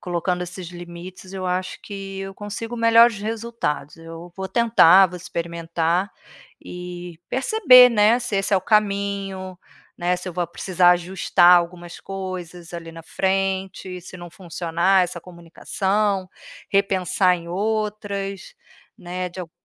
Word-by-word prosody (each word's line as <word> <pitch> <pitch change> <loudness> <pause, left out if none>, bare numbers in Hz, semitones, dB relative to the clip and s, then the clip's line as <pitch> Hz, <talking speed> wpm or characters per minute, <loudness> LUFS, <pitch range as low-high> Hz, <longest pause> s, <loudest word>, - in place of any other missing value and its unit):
colocando 180 0 -2
esses 180 0 -7
limites 175 +2 -10
eu 190 -1 -5
acho 185 +1 -3
que 195 -1 -7
eu 195 0 -6
consigo 225 +4 -6
melhores 230 -1 +5
resultados, 220 -10 -4
eu 165 +1 -11
vou 190 0 -5
tentar, 195 -6 +6
vou 180 - -8
experimentar, 170 +1 -2 0.5
e 180 -1 -8
perceber, 260 - +6
né, 220 +1 +4
se 240 -4 -2
esse 195 +1 +1
é - - +5
o - - -9
caminho, 200 -3 -1 0.4
né, 180 +1 0
se 180 +1 -7
eu 180 - -6
vou 175 -1 -1
precisar 180 +1 +3
ajustar 180 0 +4
algumas 175 0 -6
coisas 180 -3 -7
ali, 165 -1 -8
na 165 0 -10
frente, 190 0 -2
se 185 +1 -11
não 175 -1 -10
funcionar 175 +1 0
essa 175 -1 -7
comunicação, 190 +3 -2 0.4
repensar 190 -2 +2
em 170 0 -10
outras, 205 - -3 0.4
né, 180 0 -5
de 185 - -8
alg 170 -3 -8
185 Hz, 135 wpm, -22 LUFS, 175-200 Hz, 0.5 s, tentar